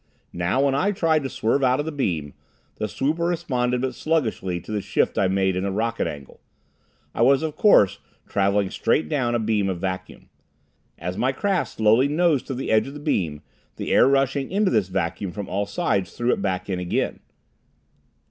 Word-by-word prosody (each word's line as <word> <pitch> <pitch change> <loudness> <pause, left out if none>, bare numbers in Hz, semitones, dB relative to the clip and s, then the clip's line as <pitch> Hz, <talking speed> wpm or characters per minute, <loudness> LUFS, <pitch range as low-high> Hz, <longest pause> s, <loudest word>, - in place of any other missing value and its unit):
Now, 90 +11 +1
when 140 - +2
I 165 +9 +1
tried 165 -5 +1
to 135 - -4
swerve 125 +4 0
out 130 +1 +3
of 145 - -1
the 160 - -3
beam, 85 - -2 0.4
the 105 - -2
swooper 155 +9 -1
responded 125 -8 -1
but 130 0 -1
sluggishly 110 - -1
to 95 - -10
the 105 -1 -1
shift - - 0
I 95 - +3
made 95 0 +1
in 90 - -1
the 100 - -1
rocket 115 +4 -1
angle. 70 -2 -9 0.7
I - - -2
was, 140 +3 +4
of 155 -2 -3
course, 105 - +4 0.3
traveling 100 0 +1
straight 80 - +1
down 120 -3 0
a - - +1
beam 105 -3 0
of 90 -2 -3
vacuum. 95 0 -5 0.7
As 90 +2 -5
my 130 +2 +2
craft 190 +7 -1
slowly 110 +5 +4
nosed 155 -2 +1
to 135 - -3
the 130 - -3
edge 110 +3 +3
of 140 - -8
the - - -7
beam, 85 - -1 0.3
the - - -4
air - - +6
rushing 135 0 +1
into 200 0 +2
this 105 -5 +2
vacuum 90 +1 -2
from 105 0 -6
all 100 +1 -2
sides 100 -3 -1
threw 120 +1 +2
it - - -3
back 95 -2 -2
in 95 -2 -2
again. 90 -1 -2
115 Hz, 195 wpm, -23 LUFS, 95-140 Hz, 0.7 s, air